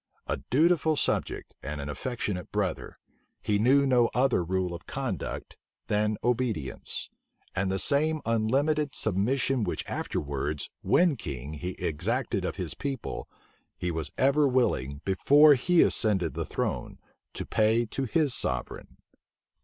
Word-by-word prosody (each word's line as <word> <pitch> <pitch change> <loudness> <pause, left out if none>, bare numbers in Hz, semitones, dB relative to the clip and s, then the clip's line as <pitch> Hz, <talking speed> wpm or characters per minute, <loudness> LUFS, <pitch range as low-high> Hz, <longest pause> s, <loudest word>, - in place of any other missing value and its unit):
A - - -2
dutiful 160 +3 +3
subject, - - -1
and 70 +2 -5
an 70 - -5
affectionate 100 - -4
brother, - - -2 0.4
he 105 -1 0
knew 135 +5 +4
no 125 -3 +4
other 125 -7 +3
rule 90 0 -1
of 85 - -9
conduct - - -4 0.3
than 105 0 +1
obedience; 115 - -2 0.4
and 95 0 0
the 95 - 0
same 155 +7 +2
unlimited 135 +7 +1
submission 120 +5 +1
which 90 - -3
afterwards, 70 +1 -3
when 175 -4 +3
king, 70 - -6
he 90 +4 -5
exacted 75 -4 -2
of - - -3
his - - -4
people, 135 -4 -5 0.5
he 90 - -2
was 80 -3 -3
ever 140 +2 +4
willing, 70 - 0
before 145 +10 +6
he 165 +6 +4
ascended 95 -7 +2
the - - -3
throne, - - -3 0.4
to - - -4
pay 110 +2 +2
to 135 +4 -3
his 140 +3 +2
sovereign. 65 0 -2
110 Hz, 135 wpm, -28 LUFS, 90-135 Hz, 0.5 s, before